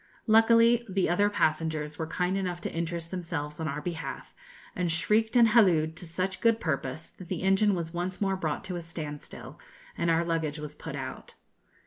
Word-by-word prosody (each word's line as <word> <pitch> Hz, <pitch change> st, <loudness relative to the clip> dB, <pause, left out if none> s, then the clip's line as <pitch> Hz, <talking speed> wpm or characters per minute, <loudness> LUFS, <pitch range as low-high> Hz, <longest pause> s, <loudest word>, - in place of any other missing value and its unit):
Luckily 230 Hz, +1 st, +5 dB
the 190 Hz, 0 st, +1 dB
other 205 Hz, +4 st, +3 dB
passengers 155 Hz, -4 st, 0 dB
were 160 Hz, -, -2 dB
kind 180 Hz, +3 st, -1 dB
enough 180 Hz, -3 st, -2 dB
to -, -, -4 dB
interest 170 Hz, 0 st, -3 dB
themselves 165 Hz, -5 st, -4 dB
on 160 Hz, -, -2 dB
our 150 Hz, 0 st, -4 dB
behalf, 165 Hz, -2 st, -5 dB, 0.4 s
and 180 Hz, -2 st, 0 dB
shrieked 215 Hz, +8 st, +2 dB
and 235 Hz, -2 st, +7 dB
hallooed 170 Hz, -8 st, +4 dB
to 175 Hz, -, -4 dB
such 185 Hz, +3 st, -3 dB
good 230 Hz, -1 st, +4 dB
purpose 140 Hz, -2 st, -3 dB
that 185 Hz, -, -9 dB
the 185 Hz, 0 st, -3 dB
engine 195 Hz, +1 st, +4 dB
was 165 Hz, -1 st, -4 dB
once 180 Hz, +2 st, -3 dB
more 195 Hz, -2 st, +1 dB
brought 160 Hz, -5 st, -2 dB
to 185 Hz, -1 st, -5 dB
a 175 Hz, -, -4 dB
standstill, 155 Hz, -3 st, -8 dB, 0.4 s
and 170 Hz, -, 0 dB
our 165 Hz, 0 st, +3 dB
luggage 165 Hz, -3 st, -1 dB
was 150 Hz, -1 st, -6 dB
put -, -, -7 dB
out. -, -, -7 dB
175 Hz, 185 wpm, -28 LUFS, 160-195 Hz, 0.4 s, and